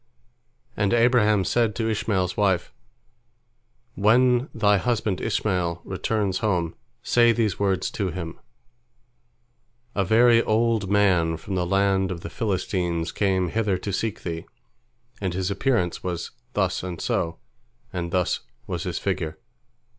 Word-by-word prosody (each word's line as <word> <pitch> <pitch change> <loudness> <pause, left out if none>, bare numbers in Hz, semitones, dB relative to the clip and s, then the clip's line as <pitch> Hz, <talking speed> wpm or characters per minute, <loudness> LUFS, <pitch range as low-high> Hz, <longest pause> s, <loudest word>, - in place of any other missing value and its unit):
And 105 +3 +2
Abraham 115 -4 +4
said 115 -1 +1
to 115 -1 -1
Ishmael's 100 -4 0
wife, 95 -4 +1 1.2
"When 125 +5 +3
thy 105 -3 +3
husband 110 -3 -1
Ishmael 90 -5 -1
returns 95 0 -1
home, 90 -7 0 0.3
say 120 -1 +4
these 110 -4 0
words 95 -4 0
to 100 -3 -2
him: 85 -2 -6 1.5
A 100 - +1
very 115 +4 +5
old 110 -3 +1
man 90 -5 +3
from 95 +5 -7
the 90 -2 0
land 95 0 +2
of 90 -3 -5
the - - -7
Philistines 90 -5 -1
came 95 -3 +1
hither 105 -1 0
to 100 +2 -5
seek 110 +3 -2
thee, 85 -2 -5 0.7
and 95 -3 -2
his 95 +1 -1
appearance 100 -4 0
was 85 -2 -4 0.2
thus 95 -3 0
and 90 -3 -6
so, 80 0 -1 0.6
and 85 -1 -3
thus 90 0 0 0.3
was - - -4
his - - -2
figure. 80 -1 -2
95 Hz, 130 wpm, -24 LUFS, 90-110 Hz, 1.5 s, very